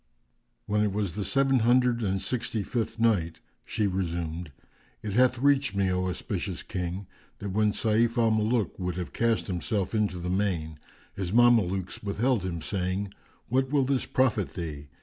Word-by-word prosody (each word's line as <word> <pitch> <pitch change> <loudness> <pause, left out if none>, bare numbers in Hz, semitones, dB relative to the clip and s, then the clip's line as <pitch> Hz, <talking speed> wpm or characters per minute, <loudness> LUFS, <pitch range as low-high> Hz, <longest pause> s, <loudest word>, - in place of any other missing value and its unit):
When 105 0 +1
it 105 -2 +1
was 100 -4 -1
the 105 - -3
Seven 135 +3 +2
Hundred 120 +1 +3
and 95 -3 0
Sixty 120 -1 -2
fifth 115 +1 -3
Night, 85 -8 +2 0.2
She 105 - -1
resumed, 85 -4 -2 0.5
It 105 - -3
hath 125 +2 +4
reached 140 -3 +2
me, 95 -1 +2
O 90 0 0
auspicious 90 - -4
King, 90 +1 -4 0.3
that 100 0 -5
when 105 +2 +2
Sayf 115 +3 +1
al 115 -1 +4
Muluk 110 0 0
would 90 -2 -2
have 90 -1 -5
cast 115 -1 +1
himself 95 +2 -2
into 105 -4 0
the 90 0 -5
main, 90 -5 -1 0.4
his 95 -3 -3
Mamelukes 105 -6 +3
withheld 115 +3 +1
him 85 -4 -4
saying, 95 +1 -2 0.3
"What 130 +2 +1
will 140 -1 +3
this 135 0 0
profit 115 -7 +1
thee? 75 -5 -5
105 Hz, 165 wpm, -28 LUFS, 90-120 Hz, 0.5 s, hath